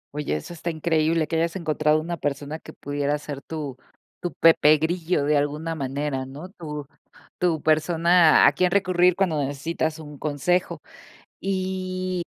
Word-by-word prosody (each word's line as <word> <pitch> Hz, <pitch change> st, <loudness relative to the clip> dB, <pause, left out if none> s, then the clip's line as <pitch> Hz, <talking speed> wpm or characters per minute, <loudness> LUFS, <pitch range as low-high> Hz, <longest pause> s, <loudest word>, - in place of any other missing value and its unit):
Oye, 150 Hz, -, -2 dB
eso 125 Hz, -, -6 dB
está 170 Hz, +1 st, -4 dB
increíble 160 Hz, 0 st, +1 dB
que 160 Hz, -, -1 dB
hayas 170 Hz, +2 st, 0 dB
encontrado 155 Hz, -3 st, +1 dB
una 170 Hz, +2 st, -4 dB
persona 145 Hz, +2 st, -3 dB
que -, -, -12 dB
pudiera 145 Hz, +1 st, -2 dB
ser 145 Hz, -1 st, -7 dB
tu 145 Hz, -5 st, -6 dB, 0.4 s
tu 175 Hz, -, -3 dB
Pepe 155 Hz, -2 st, +5 dB
Grillo 165 Hz, 0 st, 0 dB
de 150 Hz, +1 st, +2 dB
alguna 150 Hz, +3 st, -1 dB
manera, 140 Hz, -1 st, -3 dB
¿no? 150 Hz, +7 st, -9 dB
Tu 150 Hz, -6 st, -7 dB, 0.5 s
tu 170 Hz, -4 st, +1 dB
persona 165 Hz, +1 st, +5 dB
a -, -, +6 dB
quien 180 Hz, -1 st, +1 dB
recurrir 180 Hz, -2 st, +3 dB
cuando 180 Hz, -6 st, +1 dB
necesitas 155 Hz, +3 st, -2 dB
un 150 Hz, -2 st, -10 dB
consejo. 155 Hz, +5 st, -1 dB, 0.6 s
Y, 185 Hz, -1 st, -2 dB
160 Hz, 150 wpm, -24 LUFS, 150-175 Hz, 0.6 s, a